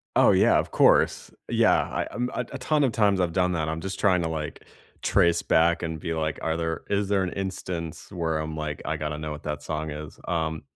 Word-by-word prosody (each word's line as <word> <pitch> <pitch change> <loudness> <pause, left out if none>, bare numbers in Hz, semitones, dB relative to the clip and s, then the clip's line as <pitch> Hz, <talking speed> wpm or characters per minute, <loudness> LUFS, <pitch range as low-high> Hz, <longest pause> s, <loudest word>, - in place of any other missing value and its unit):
Oh, - - +6
yeah, - - +5
of - - -3
course. - - +3 0.2
Yeah, - - +4
I - - -2
um, 125 0 -2
uh, 125 - -1
a 135 - -5
ton 145 +3 +1
of 130 - +2
times 100 -4 +2
I've 85 -2 +1
done 90 +1 +1
that, 80 -2 -1
I'm 80 0 -3
just 95 +4 -5
trying 90 -4 +3
to, - - 0
like, 80 -2 -5 0.4
trace 85 -1 +3
back, 85 +1 +3
and 80 -1 -3
be 85 +1 -3
like, 80 -1 -1
are 80 0 -1
there 80 -1 -2
is 100 0 +1
there 100 -1 +2
an 90 - -2
instance 90 -4 -5
where 80 -4 -1
I'm 80 0 -4
like, 75 -2 -4
"I 80 0 -1
gotta 75 -1 -3
know 75 0 -5
what 75 0 -6
that 75 -1 -4
song 80 0 -3
is?" 75 0 -8
Um 80 -2 -1
80 Hz, 235 wpm, -26 LUFS, 80-95 Hz, 0.4 s, Oh